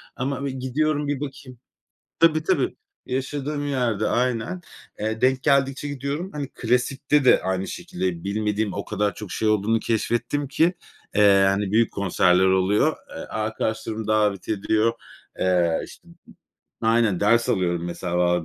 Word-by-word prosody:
Ama 135 Hz, +1 st, -3 dB
bir 140 Hz, -, -2 dB
gidiyorum, 145 Hz, +3 st, -1 dB
bir 145 Hz, -2 st, -1 dB
bakayım 135 Hz, -3 st, -8 dB, 0.6 s
Tabii, 155 Hz, -1 st, +4 dB
tabii. -, -, +1 dB, 0.3 s
Yaşadığım 145 Hz, +3 st, -3 dB
yerde 120 Hz, -6 st, 0 dB
aynen. 125 Hz, +8 st, -1 dB, 0.4 s
Eee, 110 Hz, +1 st, -2 dB
denk 130 Hz, 0 st, +2 dB
geldikçe 140 Hz, +1 st, +2 dB
gidiyorum. 145 Hz, +6 st, -4 dB
Hani, 145 Hz, -2 st, -4 dB
klasikte 130 Hz, +4 st, +1 dB
de -, -, +6 dB
aynı 95 Hz, 0 st, -1 dB
şekilde, 90 Hz, -2 st, -4 dB
bilmediğim 105 Hz, 0 st, -1 dB
o -, -, -4 dB
kadar 105 Hz, +1 st, -1 dB
çok 105 Hz, -4 st, -8 dB
şey 110 Hz, -, -1 dB
olduğunu 110 Hz, +1 st, +2 dB
keşfettim 120 Hz, +6 st, -1 dB
ki, 165 Hz, +6 st, +2 dB, 0.4 s
eee, 100 Hz, -2 st, +6 dB
hani, 100 Hz, 0 st, -1 dB
büyük 115 Hz, +2 st, +3 dB
konserler 95 Hz, -1 st, +3 dB
oluyor. 95 Hz, +2 st, +2 dB
E, -, -, -12 dB
arkadaşlarım 110 Hz, 0 st, -3 dB
davet 105 Hz, -3 st, +1 dB
ediyor. 110 Hz, +2 st, +1 dB, 0.5 s
Eee, 90 Hz, -3 st, +2 dB
işte -, -, -16 dB, 0.8 s
Aynen, 115 Hz, -4 st, +2 dB
ders 115 Hz, +3 st, +3 dB
alıyorum, 85 Hz, -2 st, 0 dB
mesela, 90 Hz, 0 st, 0 dB
110 Hz, 135 wpm, -23 LUFS, 100-135 Hz, 0.8 s, de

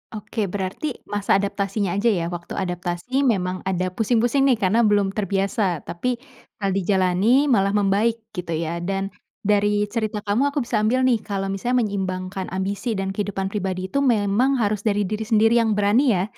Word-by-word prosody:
Oke. 215 Hz, 0 st, -3 dB
Berarti 195 Hz, +9 st, -4 dB
masa 205 Hz, -1 st, 0 dB
adaptasinya 200 Hz, -1 st, -1 dB
aja 235 Hz, -, +1 dB
ya? 180 Hz, -7 st, +2 dB
Waktu 175 Hz, 0 st, -6 dB
adaptasi 180 Hz, +9 st, -1 dB
memang 185 Hz, -4 st, 0 dB
ada 185 Hz, -1 st, -1 dB
pusing-pusing 240 Hz, +6 st, +2 dB
nih 255 Hz, -, +5 dB
karena 210 Hz, +2 st, +1 dB
belum 205 Hz, -2 st, +2 dB
terbiasa, 195 Hz, -3 st, -1 dB
tapi 245 Hz, +8 st, -2 dB, 0.4 s
kalau 195 Hz, -2 st, -1 dB
dijalani 195 Hz, +8 st, +2 dB
malah 200 Hz, -2 st, +3 dB
membaik, 205 Hz, +3 st, +2 dB, 0.2 s
gitu 180 Hz, -4 st, -4 dB
ya? 165 Hz, +1 st, -2 dB
Dan 195 Hz, +2 st, -2 dB, 0.3 s
dari 205 Hz, 0 st, +2 dB
cerita 215 Hz, -3 st, -2 dB
kamu, 240 Hz, +8 st, +1 dB
aku 285 Hz, -3 st, -1 dB
bisa 230 Hz, -2 st, 0 dB
ambil 250 Hz, +5 st, +2 dB
nih 235 Hz, -3 st, +3 dB
kalau 195 Hz, -1 st, -3 dB
misalnya 240 Hz, +5 st, 0 dB
menyeimbangkan 190 Hz, -2 st, -3 dB
ambisi 200 Hz, +4 st, -2 dB
dan 195 Hz, 0 st, -2 dB
kehidupan 195 Hz, -2 st, -2 dB
pribadi 185 Hz, -2 st, -2 dB
itu 280 Hz, -, +1 dB
memang 235 Hz, +2 st, +2 dB
harus 210 Hz, -2 st, +1 dB
dari 205 Hz, -2 st, +1 dB
diri 215 Hz, +2 st, -3 dB
sendiri 225 Hz, +1 st, +4 dB
yang 220 Hz, -2 st, +2 dB
berani 210 Hz, +4 st, +3 dB
ya? 180 Hz, -, +1 dB
205 Hz, 170 wpm, -22 LUFS, 190-225 Hz, 0.4 s, nih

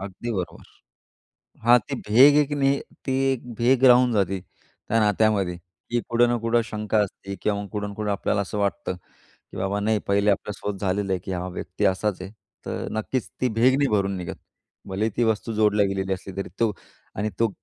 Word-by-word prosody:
अगदी 100 Hz, +5 st, -6 dB
बरोबर, 95 Hz, -4 st, -5 dB, 1.0 s
हां, 120 Hz, +1 st, +8 dB
ती -, -, -3 dB
भेग 135 Hz, +7 st, +7 dB
एक 145 Hz, -, -9 dB
नाही, 140 Hz, 0 st, +3 dB, 0.3 s
ती 130 Hz, -, 0 dB, 0.2 s
एक 125 Hz, -1 st, -7 dB
भेग 125 Hz, +3 st, +2 dB
राहून 125 Hz, 0 st, +5 dB
जाते 95 Hz, -2 st, +1 dB
त्या 115 Hz, +3 st, -5 dB
नात्यामध्ये, 105 Hz, -3 st, +2 dB, 0.3 s
की 120 Hz, 0 st, +1 dB
कुठं 120 Hz, +1 st, +4 dB
ना 120 Hz, -, +1 dB
कुठं 115 Hz, 0 st, +3 dB
शंका 105 Hz, 0 st, 0 dB
असते 100 Hz, +1 st, -9 dB
किंवा 100 Hz, -1 st, 0 dB
मग 100 Hz, -, -8 dB
कुठं 105 Hz, -1 st, -3 dB
ना 100 Hz, -, -7 dB
कुठं 105 Hz, 0 st, -2 dB
आपल्याला 100 Hz, +1 st, 0 dB
असं 100 Hz, +2 st, -5 dB
वाटतं, 100 Hz, -2 st, -1 dB, 0.4 s
की -, -, -17 dB
बाबा 100 Hz, +2 st, -1 dB
नाही, 110 Hz, +1 st, +1 dB
पहिले 100 Hz, +1 st, +3 dB
आपल्याला 100 Hz, +1 st, -2 dB
सोबत 100 Hz, -2 st, -4 dB
झालेलं 100 Hz, 0 st, 0 dB
आहे, 95 Hz, -, +1 dB
की 95 Hz, -, -4 dB
हा 90 Hz, 0 st, -3 dB
व्यक्ती 90 Hz, -, -4 dB
असाच 95 Hz, -1 st, -2 dB
आहे, 95 Hz, -, -7 dB, 0.4 s
तर -, -, -3 dB
नक्कीच 110 Hz, +4 st, -2 dB
ती 130 Hz, -, +2 dB
भेग 130 Hz, +2 st, +5 dB
नाही 140 Hz, -1 st, +2 dB
भरून 100 Hz, -1 st, 0 dB
निघत. 90 Hz, -1 st, -5 dB, 0.5 s
भलेही 105 Hz, +4 st, -1 dB
ती 120 Hz, -, +2 dB
वस्तू 110 Hz, +1 st, 0 dB
जोडली 105 Hz, -1 st, +3 dB
गेलेली 95 Hz, 0 st, -2 dB
असली 95 Hz, 0 st, -6 dB
तरी 100 Hz, -, -3 dB
तो 115 Hz, -2 st, +3 dB, 0.4 s
आणि 105 Hz, +2 st, -2 dB
तो 115 Hz, -1 st, +3 dB
105 Hz, 195 wpm, -24 LUFS, 100-115 Hz, 1.0 s, हां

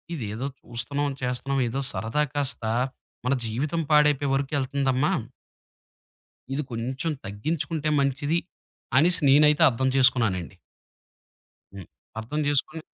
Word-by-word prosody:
ఇదేదో 110 Hz, -1 st, -4 dB, 0.2 s
చూస్తున్నాం, 140 Hz, +5 st, -3 dB
చేస్తున్నాం. 130 Hz, +2 st, -1 dB
ఏదో 135 Hz, +4 st, -2 dB
సరదా 115 Hz, +7 st, -1 dB
కాస్త 140 Hz, -4 st, -2 dB, 0.6 s
మన 140 Hz, -, +3 dB
జీవితం 145 Hz, +9 st, -1 dB
పాడైపోయే 150 Hz, -2 st, +4 dB
వరకు 140 Hz, +2 st, -2 dB
ఎళ్తుందమ్మా. 135 Hz, +1 st, 0 dB, 1.4 s
ఇది 150 Hz, -, -1 dB
కొంచెం 130 Hz, +7 st, -2 dB, 0.2 s
తగ్గించుకుంటే 155 Hz, +8 st, -2 dB
మంచిది, 140 Hz, +4 st, +1 dB, 0.6 s
అనేసి 170 Hz, +4 st, +4 dB
నేనైతే 150 Hz, +3 st, +5 dB
అర్థం 130 Hz, +1 st, -1 dB
చేసుకున్నానండి. 115 Hz, -, +2 dB, 1.2 s
హ్మ్. 95 Hz, -4 st, -9 dB, 0.3 s
అర్థం 135 Hz, +8 st, -4 dB
చేసుకొని 150 Hz, +3 st, 0 dB
140 Hz, 100 wpm, -25 LUFS, 125-150 Hz, 1.4 s, నేనైతే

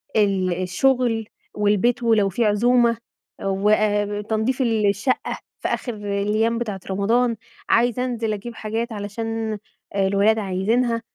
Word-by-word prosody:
ال 190 Hz, -4 st, +1 dB
الشغل 230 Hz, +2 st, +1 dB, 0.3 s
والبيت، 210 Hz, +4 st, +2 dB
ولو 220 Hz, -4 st, +3 dB
في 225 Hz, +5 st, 0 dB
عزومة 235 Hz, +2 st, +3 dB, 0.5 s
وتنضيف 210 Hz, +4 st, +1 dB
الشقة 220 Hz, +1 st, 0 dB, 0.2 s
في -, -, -2 dB
آخر 245 Hz, -, -2 dB
الأيام 210 Hz, +3 st, 0 dB
بتاعة 210 Hz, -5 st, -3 dB
رمضان، 230 Hz, +5 st, +2 dB, 0.3 s
عايزة 245 Hz, +1 st, +2 dB
أنزل 230 Hz, -3 st, -2 dB
أجيب 225 Hz, +3 st, -6 dB
حاجات 225 Hz, +2 st, -3 dB
علشان 220 Hz, +1 st, -3 dB, 0.4 s
الولاد 200 Hz, +3 st, +3 dB
عايزينها، 225 Hz, +5 st, 0 dB
220 Hz, 110 wpm, -22 LUFS, 205-235 Hz, 0.5 s, ولو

